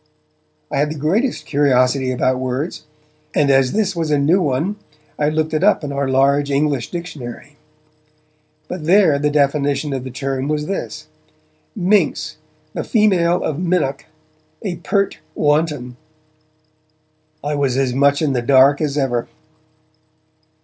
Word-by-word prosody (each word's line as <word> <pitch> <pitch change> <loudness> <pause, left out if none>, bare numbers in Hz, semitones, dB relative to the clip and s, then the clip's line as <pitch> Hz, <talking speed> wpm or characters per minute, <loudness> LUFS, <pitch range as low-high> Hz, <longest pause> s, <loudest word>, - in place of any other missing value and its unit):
I - - -1
had 150 +1 +1
the 155 - -5
greatest 195 - 0
curiosity 130 -2 +2
about 130 0 0
words, 130 +5 -3 0.5
and 145 -2 +3
as 135 -1 +3
this 200 -3 0
was 165 -2 -2
a 150 - +3
new 160 +7 +3
one, 160 +7 -1 0.4
I 150 0 +2
looked 155 +1 -1
it 155 +3 0
up 205 -4 +3
in 145 - -4
our 140 -1 -1
large 140 +2 +2
'English 140 -3 0
Dictionary'. 150 -5 -8 1.1
But 180 -4 -6
there 175 -5 +4
the 150 +1 +1
definition 145 0 +1
of 130 -2 -3
the 130 - -6
term 135 +1 -3
was 150 0 -1
this: 195 +3 -5 0.7
'Minx: 200 +1 +1 0.4
the - - -3
female 185 -6 +2
of 155 -1 -2
minnock; 170 -6 -1 0.6
a 185 -5 -3
pert 200 +2 -1 0.2
wanton.' 145 -5 0 1.5
I 145 +1 -2
was 140 -3 0
as 135 -2 +1
much 140 +3 +2
in 145 -3 +1
the 125 - 0
dark 135 +3 +4
as 150 -2 -1
ever. 120 -4 0
145 Hz, 145 wpm, -19 LUFS, 135-165 Hz, 1.5 s, there